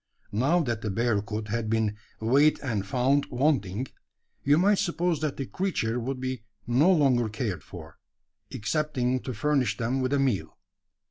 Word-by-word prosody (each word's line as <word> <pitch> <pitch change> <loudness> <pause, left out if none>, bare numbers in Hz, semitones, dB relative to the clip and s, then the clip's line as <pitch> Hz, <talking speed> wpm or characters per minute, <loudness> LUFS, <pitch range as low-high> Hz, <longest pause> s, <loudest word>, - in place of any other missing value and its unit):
Now 135 - +2
that 120 -7 -2
the 110 - -2
bearcoot 105 0 -1
had 115 0 -2
been 110 -2 +1 0.2
"weighed 140 +7 +4
and 110 -8 -1
found 135 +5 +2
wanting," 125 -5 0 0.6
you 145 +2 +4
might 200 +3 +4
suppose 175 -4 0
that 155 -3 -2
the 135 - -3
creature 125 -10 -1
would 130 +2 -3
be 130 -2 -3 0.2
no 130 +10 +4
longer 130 -9 +3
cared 110 -3 -3
for - - -11 0.5
excepting 130 +2 -1
to 130 -1 -6
furnish 145 0 +1
them 125 +3 -1
with 130 0 0
a - - +3
meal. 130 -8 -1
130 Hz, 155 wpm, -27 LUFS, 110-145 Hz, 0.6 s, weighed